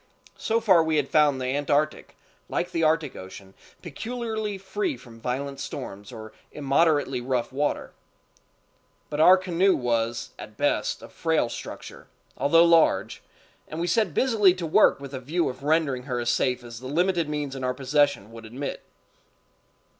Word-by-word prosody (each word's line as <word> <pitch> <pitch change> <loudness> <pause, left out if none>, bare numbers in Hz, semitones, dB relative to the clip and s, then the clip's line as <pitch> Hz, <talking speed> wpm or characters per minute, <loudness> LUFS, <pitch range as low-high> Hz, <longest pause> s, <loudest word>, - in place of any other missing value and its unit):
So 225 +1 +1
far 190 -7 +5
we 160 -1 0
had 145 -2 0
found 150 -3 +4
the 130 - -3
Antarctic, 145 +1 -1 0.3
like 175 - -2
the 165 - -1
Arctic 155 -3 +1
Ocean, 95 +1 -11 0.3
peculiarly 220 - -4
free 300 - -3
from 115 -2 -15
violent 135 +3 -3
storms 100 -6 -7
or 110 -2 -10 0.2
immoderately 145 -2 +1
rough 125 -1 -2
water; 145 +2 -1 1.2
but 150 - -3
our 180 +4 +8
canoe 185 +1 +2
was, 115 -1 -1
at - - -10
best, - - 0
of - - -11
frail 160 -7 0
structure, - - -9 0.3
although 165 +5 +4
large, 170 -1 +3 0.5
and 155 - -6
we 170 - 0
set 175 -1 +1
busily 210 -8 +4
to 180 -2 -4
work 155 - +4
with 140 0 -9
a 130 - -4
view 160 +7 -1
of 130 +1 -8
rendering 150 -3 +1
her 125 -1 -1
as 120 0 0
safe 125 -1 0
as 120 -1 -9
the 130 - -8
limited 170 +2 +1
means 145 -2 -3
in 130 - -6
our 125 0 -1
possession 140 -5 +1
would 115 0 -11
admit. 125 +6 -6
145 Hz, 160 wpm, -25 LUFS, 125-170 Hz, 1.2 s, our